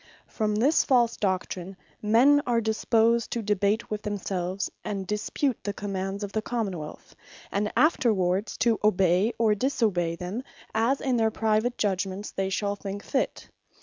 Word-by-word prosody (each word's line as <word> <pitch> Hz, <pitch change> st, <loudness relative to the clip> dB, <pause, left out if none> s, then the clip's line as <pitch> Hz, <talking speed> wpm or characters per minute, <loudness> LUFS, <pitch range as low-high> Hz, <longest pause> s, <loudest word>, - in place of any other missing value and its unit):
From 215 Hz, -2 st, -1 dB
this 270 Hz, +9 st, +3 dB
false 240 Hz, -3 st, +3 dB
doctrine, 185 Hz, -1 st, -2 dB, 0.2 s
men 250 Hz, +7 st, +5 dB
are 235 Hz, -1 st, +3 dB
disposed 225 Hz, +1 st, +2 dB
to 235 Hz, -, -2 dB
debate 210 Hz, +2 st, 0 dB
with 210 Hz, -1 st, -2 dB
themselves, 195 Hz, -2 st, -3 dB, 0.2 s
and 200 Hz, -2 st, -3 dB
dispute 210 Hz, +6 st, -1 dB
the 205 Hz, +1 st, -2 dB
commands 195 Hz, 0 st, -4 dB
of 200 Hz, -, -4 dB
the 220 Hz, -, -1 dB
Common 220 Hz, -4 st, -2 dB
wealth; 150 Hz, 0 st, -10 dB, 0.4 s
and 210 Hz, +1 st, -1 dB
afterwards 205 Hz, -, +2 dB
to 230 Hz, -2 st, +2 dB
obey, 190 Hz, 0 st, +3 dB
or 225 Hz, -2 st, +3 dB
disobey 205 Hz, -8 st, 0 dB
them, 180 Hz, +7 st, -4 dB, 0.3 s
as 230 Hz, +5 st, +1 dB
in 255 Hz, -3 st, +1 dB
their 225 Hz, -1 st, +3 dB
private 220 Hz, +2 st, 0 dB
judgements 195 Hz, 0 st, -2 dB
they 195 Hz, 0 st, -2 dB
shall 200 Hz, +1 st, -1 dB
think 200 Hz, 0 st, -6 dB
fit. 265 Hz, -, -2 dB
210 Hz, 150 wpm, -27 LUFS, 195-230 Hz, 0.4 s, men